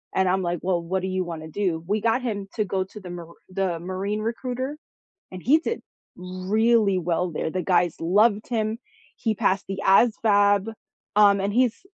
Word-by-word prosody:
And 190 0 +3
I'm 190 +1 +2
like, 175 -2 -2
"Well, 180 -2 +1
what 185 +2 -2
do - - -1
you 185 0 -1
wanna 160 -2 -6
do?" 165 -1 -2
We 210 +1 0
got 235 +3 +1
him 205 -5 -3
to 215 -2 0
go 190 0 -1
to 200 +3 -11
the 185 -3 -10
Mar 170 -1 -9
the 185 -3 -1
Marine 190 +4 -3
recruiter, 255 +5 -3 0.5
and 185 - -8
he 290 +5 +5
did 460 - -3 0.3
really 195 +3 +1
well 175 0 -1
there, 155 - -2
the 185 +2 -3
guys 175 -2 +1
loved 205 +5 +3
him, 220 -2 -1 0.4
he 220 - -1
passed 195 0 +1
the 195 0 -4
ASVAB, 205 -1 +4 0.4
um, 200 -2 +5
and 200 +1 -1
he's 245 - +1
195 Hz, 185 wpm, -24 LUFS, 180-215 Hz, 0.5 s, he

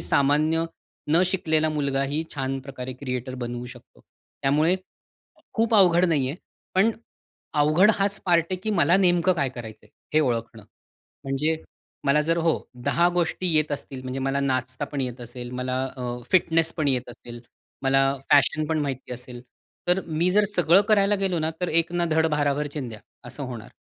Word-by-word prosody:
सामान्य 155 +4 +2 0.5
न 165 +4 +5
शिकलेला 160 -4 +1
मुलगाही 140 0 -1
छान 135 0 -2
प्रकारे 130 -1 -7
क्रिएटर 130 -1 -5
बनवू 120 -1 -5
शकतो. 120 - -14 0.4
त्यामुळे 155 +6 +3 0.8
खूप 225 0 +1
अवघड 180 -4 +6
नाहीये 145 -6 +1 0.4
पण; 195 +4 +4 0.6
अवघड 155 +7 +5
हाच 200 0 -1
पार्ट 170 -2 +4
आहे 185 - 0
की, 215 - -2
मला 175 -3 +4
नेमकं 180 -1 +3
काय 140 -5 0
करायचंय 115 -4 -10 0.3
हे 155 - +6
ओळखणं. 115 -5 -2 0.6
म्हणजे 140 +4 0 0.5
मला 140 +2 +3
जर 165 +2 +1
हो 165 -1 +2 0.3
10 175 +1 +3
गोष्टी 175 +1 0
येत 155 -1 +2
असतील 135 -2 -5
म्हणजे 130 +1 -4
मला 135 +1 0
नाचता 130 0 -1
पण 145 0 -5
येत 125 -1 -4
असेल, 120 +1 -8
मला 125 +1 -2
अ, 125 -1 -4 0.2
फिटनेस 165 -3 +3
पण 155 -4 0
येत 125 -2 0
असेल, 120 0 -11 0.4
मला 135 0 +3 0.2
फॅशन 150 +2 +4
पण 160 0 0
माहिती 135 -4 -4
असेल. 125 0 -9 0.5
तर 180 +2 +3
मी 165 +3 0
जर 210 +3 +4
सगळं 175 +2 +5
करायला 205 -1 +4
गेलो 190 -3 0
ना 160 0 0
तर, 180 - 0
"एक 165 +2 +2
ना 175 0 +1
धड 160 +1 +3
भाराभर 145 0 0
चिंध्या" 120 -8 -5 0.2
असं 125 +3 -7
होणार. 120 -3 -7
145 Hz, 165 wpm, -25 LUFS, 130-170 Hz, 0.8 s, अवघड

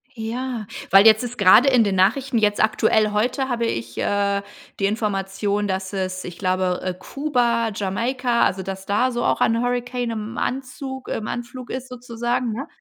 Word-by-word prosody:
Ja, 230 -1 -4 0.2
weil 195 +3 +8
jetzt 220 +2 +6
ist 245 -2 -6
grade 215 +7 +7
in 250 -3 +5
den 200 -2 0
Nachrichten 235 +7 +2
jetzt 210 -1 +2
aktuell 215 0 +2
heute 250 +5 0
habe 235 -2 0
ich, 115 - -4
äh, 200 0 0 0.4
die 195 - +1
Information, 205 -1 -1
dass 190 0 -3
es, 185 -2 -3
ich 175 -1 -8
glaube, 185 -1 0
äh, 185 - -1
Kuba, 235 -1 0
Jamaika 235 +5 0
also 190 - +1
dass 190 0 -6
da 215 +6 +1
so 240 -1 -2
auch - - +1
ein 230 +1 +3
Hurrikan 245 0 -2
im 220 +1 -5
Anzug 265 0 -4
im 215 - -3
Anflug 240 +1 -6
ist 260 0 -5
sozusagen, 240 0 -2
ne? 270 +8 -5
225 Hz, 175 wpm, -22 LUFS, 200-245 Hz, 0.4 s, weil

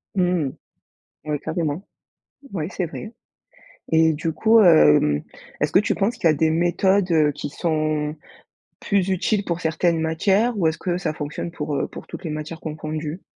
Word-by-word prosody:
Mmh. 180 -7 +1 0.7
Ouais, 150 -1 -2
carrément. 160 +2 -3 0.7
Ouais, 165 -5 -3
c'est 185 - -2
vrai. 215 +7 -8 0.8
Et 160 0 +4
du 160 +2 -3
coup, 225 +6 +4
hem, 75 - +5 0.4
est-ce - - +1
que - - +5
tu 210 - 0
penses 210 +4 0
qu'il - - +2
y - - +4
a - - -2
des 160 +2 +2
méthodes, 180 +4 +2
heu, 155 -2 +4
qui 145 0 -6
sont 155 -1 -1 0.6
plus 200 -2 0
utiles 195 +2 0
pour 170 0 -2
certaines 165 +1 +1
matières? 195 +8 +1
Ou 170 -5 +2
est-ce 160 +1 -1
que 175 -1 -2
ça 175 -4 -2
fonctionne 150 +3 -5
pour, 150 -3 -4
heu, - - -1
pour - - -11
toutes - - -9
les - - -3
matières 155 +2 -6
confondues? 155 +2 -5
160 Hz, 175 wpm, -22 LUFS, 155-185 Hz, 0.8 s, hem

